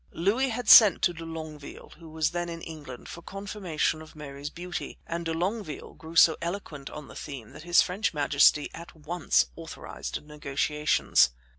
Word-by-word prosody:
Louis 220 +10 +1
had 245 +1 -4
sent 215 -5 +9
to 175 - +3
de 165 0 -8
Longueville, 155 -3 -8
who 165 -1 -12
was 155 0 0
then 175 0 -3
in 165 -1 -7
England, 145 -6 -9
for 170 - -9
confirmation 190 -5 -2
of 160 - -13
Mary's 145 -1 -7
beauty, 175 +2 -6
and 170 0 -4
de 165 - -1
Longueville 175 -1 -3
grew 160 +1 -11
so 160 -1 +7
eloquent 170 -5 -5
on 150 -1 -9
the - - -12
theme 130 -6 -8
that - - -11
his 175 +2 +5
French 195 +4 -1
majesty 145 0 +3
at 170 +1 -10
once 160 +2 +1
authorized 65 - -7
negotiations. 150 0 +2
160 Hz, 170 wpm, -28 LUFS, 150-175 Hz, -, sent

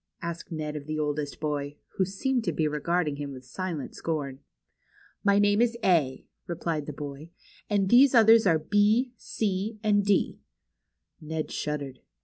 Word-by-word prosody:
asked 170 +1 -5
Ned 155 -2 -4
of 145 -1 -6
the 155 0 -2
oldest 150 -1 -2
boy, 145 -1 -2 0.2
who 190 - +3
seemed 240 +6 -1
to 175 - +1
be 155 0 0
regarding 150 0 0
him 140 -1 -5
with 130 -1 -11
silent 165 +2 -5
scorn. 145 -5 -3 0.8
My 200 -1 +4
name 205 +1 +4
is 235 -1 +2
A," 155 -8 +2 0.2
replied 165 -3 -3
the - - -3
boy; 145 +2 -8 0.4
and 200 -2 +2
these 255 +5 +6
others 225 -1 +7
are 165 -3 +5
B, 210 +9 +2
C, 210 +1 -2
and 205 -1 +3
D." 200 0 +1 0.8
Ned 155 0 -4
shuddered. 145 -3 -4
165 Hz, 155 wpm, -27 LUFS, 150-205 Hz, 0.8 s, others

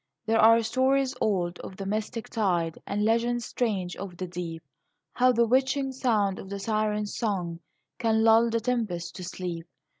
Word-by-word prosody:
There 225 0 +2
are 230 +1 +6
stories 260 +3 +2
old, 180 -4 0
of 190 - -9
the 195 - -5
mystic 215 +3 -3
tide, 175 -7 0
And 205 +1 0
legends 235 +1 +1
strange, 195 -7 -2
of 190 -3 -7
the 185 - -3
deep, 170 -2 -6 0.5
How 255 +1 +4
the 235 -1 +3
witching 265 +3 +1
sound 215 -7 +1
of 190 - -9
the 200 - -4
siren's 210 0 -1
song 180 -7 -2 0.4
Can 220 -1 +2
lull 225 +1 +5
the 230 0 0
tempest 210 -9 -2
to 185 - -7
sleep. 175 -1 -5
215 Hz, 170 wpm, -27 LUFS, 185-235 Hz, 0.5 s, are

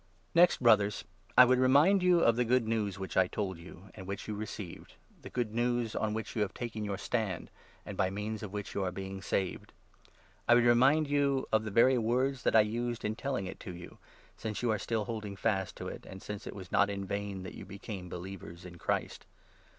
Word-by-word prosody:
Next, 175 +1 +6
Brothers, 105 -3 +4 0.3
I 125 - +11
would 125 0 +3
remind 145 +10 +5
you 180 -1 +4
of 115 - +4
the 125 - +2
Good 120 -1 +2
News 105 -4 -1
i; - - -9
which 95 - -5
I 95 -1 +4
told 95 -3 -3
you, 90 +2 -13
and 95 - -10
which 100 0 -5
you 105 - -3
received 105 -3 -7
— - - -29
the - - -9
Good 120 -4 -2
News 120 -1 0
on 110 0 -1
which 110 - -5
you 110 - 0
have 105 - -1
taken 115 -3 -4
your 100 -2 -2
stand, 105 -4 -2 0.3
and 105 - -6
by 95 -1 +1
means 105 +2 -4
of 105 -3 -6
which 105 -1 -5
2 - - -3
you 95 - 0
are 90 - -1
being 95 +1 -6
saved. 95 -1 -2 0.7
I 120 - +7
would 120 - +5
remind 135 +6 +5
you 140 -2 +1
of 110 0 +2
the - - -2
very 125 +5 +5
words 125 +3 +1
that - - +1
I 110 - +9
used 120 +2 -2
in 105 +1 -1
telling 130 -6 -2
it 95 - -7
to 90 - -7
you, 85 0 -11 0.4
since 110 +1 -4
you 120 - +2
are 105 - 0
still 110 0 -1
holding 105 -4 -5
fast 95 -2 -1
to - - -6
it, - - -8
and 95 - -9
since 105 -1 -6
it - - -6
was 95 -3 -9
not 100 0 +4
in 100 -1 -3
vain 100 -1 -4
that 95 - -7
you - - -9
became 100 -2 -7
believers 90 -1 -8
in 85 -1 -10
Christ. - - -2
105 Hz, 235 wpm, -31 LUFS, 95-120 Hz, 0.7 s, I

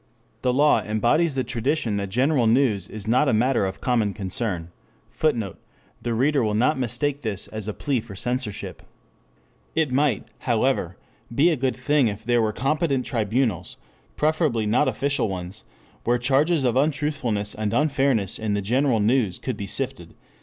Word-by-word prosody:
The 125 - +2
law 145 +4 +4
embodies 120 +9 +1
the 130 - 0
tradition 120 -1 -1
that 100 -1 -3
general 125 +3 +2
news 115 -6 +2
is 110 -1 -7
not 125 +5 +3
a - - +3
matter 120 -2 +2
of 95 - -7
common 115 -6 +1
concern, 95 -3 -3 0.4
[Footnote: 115 - -1 0.4
The 120 -1 -2
reader 135 +2 +2
will 105 -1 0
not 130 +6 +2
mistake 145 +4 -1
this 105 -5 -2
as 110 -1 -3
a 105 - -2
plea 140 -4 -1
for 110 -3 -10
censorship. 125 0 -3 0.9
It 160 -4 +1
might, 135 -4 +1
however, - - 0 0.4
be 160 +7 +4
a - - +2
good 130 -1 -1
thing 140 0 +2
if 105 +1 -4
there 120 0 +2
were 110 -1 +1
competent 140 - 0
tribunals, 115 -3 -1 0.4
preferably 150 -7 +1
not 120 +8 +2
official 140 -5 0
ones, 95 +3 -6 0.4
where 120 +1 +2
charges 140 +5 +2
of 125 -2 +1
untruthfulness 140 -7 0
and 105 -1 -2
unfairness 135 - +1
in 110 -2 -1
the 100 - -1
general 125 +2 +2
news 110 -4 +2
could 130 - -4
be 100 -1 -6
sifted. 130 -6 -4
120 Hz, 165 wpm, -24 LUFS, 105-140 Hz, 0.9 s, law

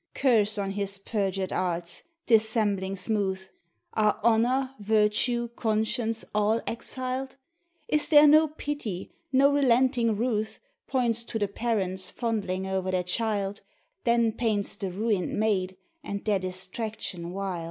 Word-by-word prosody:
Curse 215 -5 +3
on 195 -1 -2
his 200 0 -3
perjured 195 -2 -2
arts! 175 -1 -2 0.2
dissembling 215 -4 +2
smooth.! 195 -1 -1 0.5
Arc 215 0 +2
honor, 245 +4 +2
virtue, 220 +3 +1
conscience, 225 0 -1
all 210 +2 +2
exiled? 255 +2 -4 0.5
Is 300 -1 +4
there 295 -1 +8
no 310 +2 +7
pity, 290 - -5 0.2
no 275 +1 +5
relenting 250 -4 +3
ruth, 220 -2 -1 0.3
Points 235 -3 0
to 225 - -4
the 205 -2 0
parents 195 -4 -1
fondling 200 -6 -2
o'er 190 -1 -2
their 185 -1 0
child, 205 +1 -1 0.4
Then 235 -2 +3
paints 215 -4 -1
the 195 -2 -4
ruined 200 0 -1
maid, 190 -4 0 0.3
and 200 0 -5
their 205 -3 +2
distraction 185 -1 -4
wild? 190 -2 -3
215 Hz, 125 wpm, -27 LUFS, 195-235 Hz, 0.5 s, there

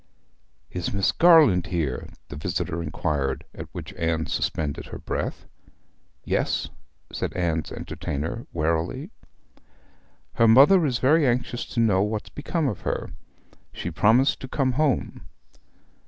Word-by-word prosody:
'Is 90 -1 -3
Miss 100 -1 +1
Garland 155 - +5
here?' 75 -8 -2 0.2
the - - -7
visitor 80 +3 -3
inquired, 75 -4 -2
at - - -8
which 90 +3 -8
Anne 80 -3 -1
suspended 75 -3 -2
her - - -7
breath. - - -4 0.8
'Yes,' - - 0 0.4
said - - -3
Anne's 85 -3 -1
entertainer, 80 +12 -5
warily. 85 - -1 1.2
'Her 115 - +4
mother 145 +9 +7
is 125 -3 0
very 145 +4 +4
anxious 120 0 -1
to - - +1
know 105 -5 +3
what's 105 +1 -2
become 150 +1 -2
of 110 - -3
her. - - -3 0.6
She 85 - -5
promised 115 - +3
to 130 - -7
come 130 0 0
home.' 140 +1 -1
105 Hz, 125 wpm, -25 LUFS, 80-130 Hz, 1.2 s, mother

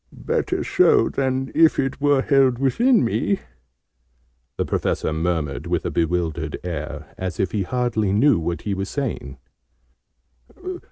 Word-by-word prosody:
"Better - - 0
so, - - +4
than 135 0 -1
if 165 -1 +4
it 135 +1 -2
were 145 -2 +3
held 135 -3 +3
within 230 - +3
me!" 200 - 0 1.2
the - - 0
Professor 80 - -1
murmured 80 -3 -2
with - - -1
a - - -1
bewildered 85 -1 -1
air, 80 -4 -6
as 90 -3 -4
if 95 -3 0
he 105 - -1
hardly 110 -1 0
knew 115 - +4
what 85 +1 -3
he 105 - -2
was 95 0 -3
saying. 115 - -4
110 Hz, 135 wpm, -22 LUFS, 85-135 Hz, 1.2 s, so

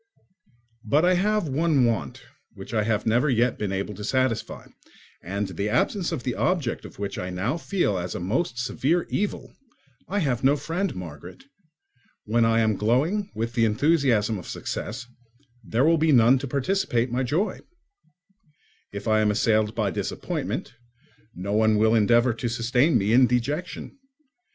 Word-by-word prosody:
But 145 +10 +2
I 180 - +4
have 205 0 +1
one 145 -1 +2
want 95 - -2 0.3
which 95 +4 -10
I 110 - +2
have 105 -2 0
never 120 +7 +2
yet 120 -1 +1
been 105 -2 -2
able 100 +2 -3
to 105 +1 -8
satisfy, 130 +1 -1 0.6
and 100 +2 -3
the 100 +3 -3
absence 180 - 0
of 160 -7 -4
the 125 - -2
object 160 -8 -1
of - - -12
which 100 0 -4
I 90 - -4
now 95 - -2
feel 170 - -1
as 90 0 -5
a - - -3
most 115 - -1
severe 140 +7 0
evil, 205 0 -3 0.5
I 200 - -2
have 135 -10 0
no 135 +2 +4
friend, 170 +6 -3
Margaret: 85 - -9 0.8
when 115 +2 +2
I 115 0 +3
am 110 -3 +1
glowing 155 - +1
with 115 +1 -3
the 115 -1 +1
enthusiasm 115 - +2
of 90 - -11
success, 120 +3 -5 0.6
there 115 +5 +1
will 165 0 +4
be 160 0 +3
none 125 0 +5
to 140 - -5
participate 130 -4 0
my 125 +2 0
joy; 170 - -1 1.3
if 100 +3 -7
I 110 0 +3
am 105 -1 +2
assailed 110 0 +1
by 105 -4 0
disappointment, - - -4 0.6
no 95 +3 -4
one 110 0 +3
will 110 +1 +3
endeavour 115 +2 +4
to 115 +1 -3
sustain 125 +6 +2
me 105 +3 +1
in 125 +1 +6
dejection. 145 - -3
120 Hz, 165 wpm, -25 LUFS, 105-150 Hz, 1.3 s, in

